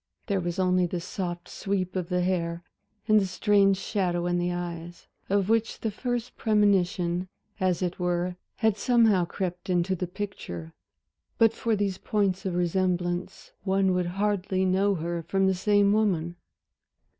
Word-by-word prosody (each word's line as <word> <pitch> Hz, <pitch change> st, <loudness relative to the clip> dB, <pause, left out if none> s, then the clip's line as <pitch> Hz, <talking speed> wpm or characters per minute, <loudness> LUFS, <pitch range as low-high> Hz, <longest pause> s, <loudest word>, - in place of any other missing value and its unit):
There 200 Hz, -3 st, 0 dB
was 175 Hz, +1 st, -3 dB
only 185 Hz, -1 st, +2 dB
the 175 Hz, +1 st, -3 dB
soft 175 Hz, -1 st, -5 dB
sweep 190 Hz, -2 st, -2 dB
of 180 Hz, -2 st, -2 dB
the 180 Hz, -1 st, +1 dB
hair, 170 Hz, -2 st, -1 dB, 0.4 s
and 215 Hz, -1 st, +6 dB
the 195 Hz, -, -1 dB
strange 195 Hz, 0 st, +3 dB
shadow 180 Hz, -4 st, -1 dB
in 175 Hz, 0 st, +1 dB
the 175 Hz, 0 st, 0 dB
eyes 175 Hz, -1 st, -6 dB, 0.2 s
of 195 Hz, -1 st, +2 dB
which 225 Hz, 0 st, +1 dB
the 220 Hz, -, -1 dB
first 245 Hz, +2 st, -3 dB
premonition 190 Hz, -4 st, +2 dB, 0.3 s
as 185 Hz, -2 st, +1 dB
it 180 Hz, 0 st, -2 dB
were 180 Hz, 0 st, 0 dB, 0.2 s
had 220 Hz, -2 st, +1 dB
somehow 220 Hz, -6 st, +4 dB
crept 180 Hz, +1 st, -4 dB
into 180 Hz, +1 st, +1 dB
the 180 Hz, 0 st, -3 dB
picture 170 Hz, -, -6 dB, 0.6 s
but 225 Hz, -1 st, +5 dB
for 225 Hz, -1 st, 0 dB
these 200 Hz, -2 st, -1 dB
points 195 Hz, -2 st, 0 dB
of 180 Hz, -, -2 dB
resemblance 175 Hz, 0 st, -1 dB
one 190 Hz, -1 st, +2 dB
would 180 Hz, -1 st, 0 dB
hardly 195 Hz, -2 st, 0 dB
know 195 Hz, +2 st, +2 dB
her 170 Hz, 0 st, -3 dB
for 195 Hz, +4 st, -2 dB
the 190 Hz, 0 st, +4 dB
same 205 Hz, +1 st, +3 dB
woman. 175 Hz, -6 st, +1 dB
185 Hz, 155 wpm, -27 LUFS, 175-200 Hz, 0.6 s, and